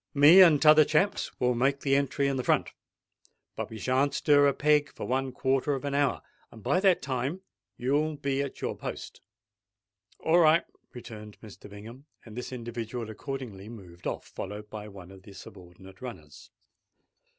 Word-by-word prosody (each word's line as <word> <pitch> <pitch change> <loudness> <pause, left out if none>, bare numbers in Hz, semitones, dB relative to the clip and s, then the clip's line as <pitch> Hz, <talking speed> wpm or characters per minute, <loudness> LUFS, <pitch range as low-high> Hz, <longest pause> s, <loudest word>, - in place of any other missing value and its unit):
Me 150 +7 +8
and 165 -5 +7
t'other 155 0 +8
chaps 155 +7 0
will 125 0 +2
make 135 +3 0
the 135 -1 +2
entry 140 0 0
in 135 -2 -1
front. - - +1 0.8
But - - -5
we 110 - -8
shan't 135 +4 0
stir 145 -1 +4
a 140 - +2
peg 150 0 +2
for - - -7
one 130 +1 -1
quarter 135 +2 0
of 135 - -6
an 140 - -3
hour; 140 -1 0 0.3
and 110 -3 -15
by 180 - +2
that 190 -2 +3
time 135 +7 -3 0.4
you'll 145 +5 0
be 140 -1 -2
at 140 -1 -6
your - - -3
post." - - -8 1.0
"All 165 +2 +2
right," 160 0 +4 0.3
returned 110 -4 -11
Mr. 105 -2 -13
Bingham; 115 +7 -12 0.2
and 110 -2 -12
this 125 +1 -6
individual 120 -1 -6
accordingly 110 -5 -7
moved 90 -7 -10
off, - - -4
followed 105 +2 -8
by 105 -1 -7
one 95 -3 -12
of 95 -1 -14
the 100 +1 -14
subordinate 95 0 -14
runners. 85 -13 -10
130 Hz, 170 wpm, -28 LUFS, 105-145 Hz, 1.0 s, Me